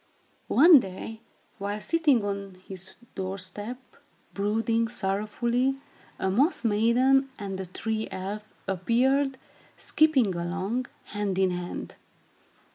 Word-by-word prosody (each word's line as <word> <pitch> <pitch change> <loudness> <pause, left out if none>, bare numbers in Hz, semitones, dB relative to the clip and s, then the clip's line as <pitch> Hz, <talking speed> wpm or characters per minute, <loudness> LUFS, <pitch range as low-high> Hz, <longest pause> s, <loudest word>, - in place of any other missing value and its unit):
One 320 +1 +8
day, 220 +2 -7 0.4
while 205 +1 -3
sitting 290 -5 +2
on 200 -1 -4
his 190 -1 -7 0.2
door 190 0 -3
step, 205 +6 -6 0.6
brooding 225 +3 +1
sorrowfully, 235 +5 0 0.4
a 190 - 0
Moss 275 - +2
Maiden 245 +5 +3
and 195 -3 -5
a 190 - -5
Tree 220 +4 -2
Elf 200 +3 -5 0.2
appeared, 260 +8 +2 0.4
skipping 275 -11 +3
along, 190 +8 -2 0.3
hand 205 -2 -1
in 190 -1 +3
hand. 180 0 -5
210 Hz, 110 wpm, -27 LUFS, 190-250 Hz, 0.6 s, One